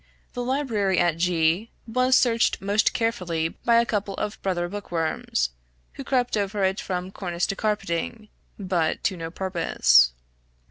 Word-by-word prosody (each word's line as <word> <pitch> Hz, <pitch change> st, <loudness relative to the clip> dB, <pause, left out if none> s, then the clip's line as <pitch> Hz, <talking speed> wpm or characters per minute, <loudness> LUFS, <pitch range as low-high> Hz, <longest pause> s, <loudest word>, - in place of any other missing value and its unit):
The 245 Hz, -, -3 dB
library 235 Hz, -8 st, 0 dB
at 175 Hz, -2 st, +2 dB
G 170 Hz, +4 st, +1 dB, 0.2 s
was 255 Hz, +3 st, +3 dB
searched 230 Hz, -2 st, +2 dB
most 200 Hz, +2 st, +2 dB
carefully 180 Hz, -8 st, -1 dB
by 235 Hz, +7 st, 0 dB
a 235 Hz, -, +2 dB
couple 205 Hz, -3 st, -2 dB
of 210 Hz, 0 st, -4 dB
brother 175 Hz, -2 st, -1 dB
book 205 Hz, +1 st, -8 dB
worms, 160 Hz, -, -1 dB, 0.4 s
who 275 Hz, -, -7 dB
crept 250 Hz, -3 st, 0 dB
over 205 Hz, -1 st, -1 dB
it 190 Hz, +1 st, +1 dB
from 185 Hz, 0 st, -4 dB
cornice 175 Hz, -3 st, -2 dB
to 195 Hz, -, -3 dB
carpeting; 210 Hz, +1 st, -2 dB, 0.3 s
but 180 Hz, -5 st, -1 dB
to 190 Hz, -, +1 dB
no 165 Hz, -2 st, -5 dB
purpose. 165 Hz, -, +3 dB
195 Hz, 150 wpm, -25 LUFS, 170-220 Hz, 0.4 s, was